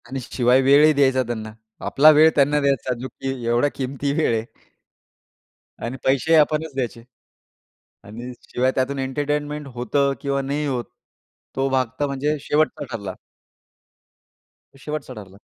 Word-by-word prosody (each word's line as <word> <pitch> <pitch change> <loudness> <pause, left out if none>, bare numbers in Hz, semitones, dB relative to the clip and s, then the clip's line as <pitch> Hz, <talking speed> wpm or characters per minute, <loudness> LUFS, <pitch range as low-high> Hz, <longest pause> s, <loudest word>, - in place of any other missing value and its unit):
आणि 135 +2 -5
शिवाय 125 +1 +2
वेळही 145 +3 +6
द्यायचा 135 -2 +3
त्यांना. 110 -2 -5 0.3
आपला 150 +3 +6
वेळ 155 +1 +6
त्यांना 145 +1 +3
द्यायचा, 135 -2 0
जो 130 - -5
की 135 - -7 0.2
एवढ्या 120 +5 +2
किमती 140 +1 -3
वेळ 150 -5 +1
आहे. 110 - -3 1.4
आणि 120 +3 -4
पैसेही 140 +5 +3
आपणच 155 0 +2
द्यायचे 120 -3 -3 1.0
आणि 120 +5 -8 0.2
शिवाय 130 +1 +1
त्यातून 135 +2 -1
एंटरटेनमेंट 145 +2 -2
होतं 140 +4 +1
किंवा 140 -1 -1
नाही 145 +2 -2
होत, 125 -4 -2 0.7
तो 135 0 +1
भाग 130 -1 +1
तर 145 - +2
म्हणजे 145 +2 -1
शेवटचा 150 0 0
ठरला. 100 -4 -5 1.6
तो - - -18
शेवटचा 150 -3 -5
ठरला. 100 -4 -12
135 Hz, 140 wpm, -22 LUFS, 125-145 Hz, 1.6 s, वेळही